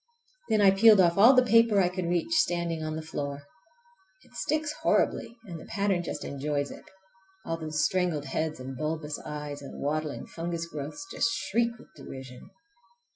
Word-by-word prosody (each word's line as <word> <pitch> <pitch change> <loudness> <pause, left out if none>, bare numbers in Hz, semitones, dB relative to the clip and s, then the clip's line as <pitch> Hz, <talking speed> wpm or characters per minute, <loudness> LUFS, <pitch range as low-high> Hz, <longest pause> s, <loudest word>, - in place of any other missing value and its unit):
Then 215 -1 +3
I 195 -1 +7
peeled 210 +1 +7
off 175 0 +4
all 240 +6 +8
the 255 - +6
paper 230 -3 +5
I 185 - +4
could 180 -1 -3
reach 175 - 0
standing 170 - +1
on 155 0 -3
the 160 - -5
floor. 145 -2 -5 0.8
It - - -23
sticks 305 -1 -1
horribly 235 - +1
and 170 -5 -7
the - - -11
pattern 200 -3 0
just 175 - -5
enjoys 145 0 -2
it! - - -11 0.6
All 165 - -2
those 155 -1 -1
strangled 175 -6 0
heads 155 +3 -2
and 130 +1 -7
bulbous 155 +1 -3
eyes 150 -1 -6
and 140 - -9
waddling 150 +1 -2
fungus 170 0 -4
growths 155 - -7
just 230 - +1
shriek 235 +1 0
with 240 - -18
derision! 130 -2 -10
165 Hz, 175 wpm, -28 LUFS, 150-200 Hz, 0.8 s, all